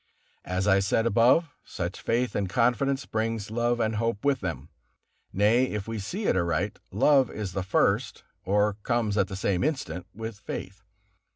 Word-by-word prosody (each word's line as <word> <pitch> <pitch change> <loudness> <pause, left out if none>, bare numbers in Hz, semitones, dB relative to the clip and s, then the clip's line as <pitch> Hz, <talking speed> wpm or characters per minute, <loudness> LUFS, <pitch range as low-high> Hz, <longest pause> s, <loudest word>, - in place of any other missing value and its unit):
As 90 +2 -1
I 95 -1 +5
said 100 +4 +1
above, 120 - +4
such 90 +1 -5
faith 120 +2 0
and 100 -2 -1
confidence 125 +5 +1
bring 110 +1 -1
love 120 +1 0
and 110 -1 0
hope 115 0 -1
with 140 -2 +3
them. 80 - -5 0.6
Nay, 110 +6 +3
if 105 -5 -4
we 115 -1 -4
see 185 - -4
it - - +2
aright, 90 +2 -1
love 135 +4 +4
is 100 -4 -5
the 95 - -1
first, 95 +1 +1 0.2
or 105 +2 +2
comes 115 -3 0
at 100 -2 +2
the 95 - -6
same 95 -1 0
instant 90 - -2
with 110 -1 -6
faith. 100 -1 -7
105 Hz, 170 wpm, -27 LUFS, 95-120 Hz, 0.6 s, I